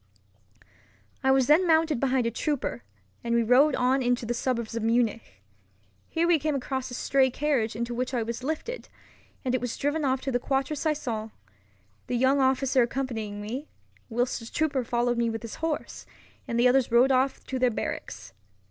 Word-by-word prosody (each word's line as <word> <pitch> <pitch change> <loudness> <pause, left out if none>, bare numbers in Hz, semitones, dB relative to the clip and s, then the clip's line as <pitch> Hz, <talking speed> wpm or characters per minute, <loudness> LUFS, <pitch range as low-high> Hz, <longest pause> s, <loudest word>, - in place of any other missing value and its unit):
I 265 - +3
was 265 -1 +4
then 315 +7 +4
mounted 320 -4 +3
behind 260 -2 +1
a 230 - 0
trooper, 245 - -2 0.4
and 235 0 0
we 235 - +3
rode 260 +5 +5
on 260 +2 +2
into 245 -1 0
the 240 - -1
suburbs 235 -2 -2
of 230 - -2
Munich. 225 - -1 0.7
Here 335 +1 +1
we 340 -2 +4
came 300 0 -1
across 260 -1 -3
a 245 - -6
stray 265 +1 +2
carriage 255 -5 0
into 235 +1 -3
which 250 +2 -2
I 245 -3 0
was 235 +2 -5
lifted, 320 - -4 0.6
and 255 - 0
it 255 - +1
was 245 -2 -3
driven 290 +2 -1
off 265 -1 +1
to 270 - -3
the 245 - +1
Quatre 270 +3 -1
Saisons—the 215 - -5
young 265 +3 +3
officer 265 0 +3
accompanying 230 -5 -2
me, 250 +8 -5 0.4
whilst 245 +2 -1
a 230 - -10
trooper 290 -4 0
followed 240 0 0
with 230 0 -2
his 230 - -7
horse, 320 -2 -3 0.4
and 235 0 -1
the 245 - +6
others 250 -1 +3
rode 245 +3 +5
off 265 +1 +1
to 260 - -3
their 250 0 +4
barracks. 105 - -5
250 Hz, 180 wpm, -27 LUFS, 230-270 Hz, 0.7 s, the